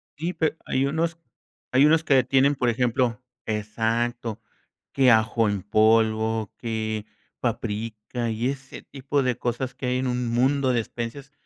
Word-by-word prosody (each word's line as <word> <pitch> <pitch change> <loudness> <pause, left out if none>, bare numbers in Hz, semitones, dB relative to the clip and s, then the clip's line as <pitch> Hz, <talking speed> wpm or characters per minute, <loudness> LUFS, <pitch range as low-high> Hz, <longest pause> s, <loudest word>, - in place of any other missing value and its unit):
Sí, 165 +5 -3
pe 160 -1 0
hay 130 +1 +1
unos, 160 +3 -1 0.5
hay 130 +3 +5
unos 160 +1 +4
que 135 -4 +4
tienen, 135 +3 +3
por 125 -2 +1
ejemplo 120 -1 0 0.2
exacto, 115 +2 -2 0.5
que 135 -2 +4
ajo 110 0 +3
en 100 -2 -1
polvo, 110 +1 +2
que 110 -2 -3 0.3
paprika 110 +2 -3
y 115 +3 -1
ese 135 0 -7
tipo 140 +1 -2
de 125 -2 0
cosas, 125 +1 -2
que 130 - -6
hay 125 0 +1
en 130 - -1
un 125 -1 -1
mundo 130 +3 +2
de 120 - +2
especias, 120 +5 -7
120 Hz, 150 wpm, -25 LUFS, 110-135 Hz, 0.5 s, hay